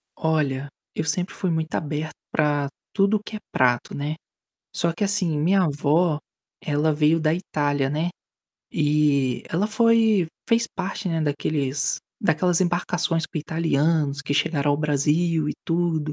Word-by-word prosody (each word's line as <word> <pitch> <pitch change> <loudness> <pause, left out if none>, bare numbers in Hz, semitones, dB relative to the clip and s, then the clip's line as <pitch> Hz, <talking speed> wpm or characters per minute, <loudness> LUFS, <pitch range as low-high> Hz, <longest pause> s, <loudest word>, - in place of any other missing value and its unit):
Olha, 145 -4 0 0.3
eu 155 - -1
sempre 175 +3 -1
fui 185 - -2
muito 160 -1 -1
aberto 155 0 -3 0.2
pra 145 -2 +1 0.3
tudo 200 +1 +3
que 215 - -7
é - - -5
prato, 125 -1 +2
né. 145 +2 -3 0.6
Só 170 -1 +1
que, 205 - -2
assim, 190 -6 0
minha 185 +5 +3
avó, 150 +1 +2 0.4
ela 150 +1 +1
veio 155 +2 +3
da 155 0 +2
Itália, 145 -6 -1
né, 160 +4 0 0.6
e 145 -4 +2
ela 180 +6 0
foi 220 -4 +3 0.2
fez 230 0 +3
parte, 190 +1 -3
né, 165 -1 0
daqueles 145 -1 0 0.2
daquelas 180 -2 +2
embarcações 175 -2 0
com 165 - -5
italianos 155 -2 +1
que 140 - -2
chegaram 145 -1 +1
ao 145 - +2
Brasil 150 +2 +1
e - - -1
tudo. 165 -3 0
160 Hz, 145 wpm, -24 LUFS, 145-175 Hz, 0.6 s, tudo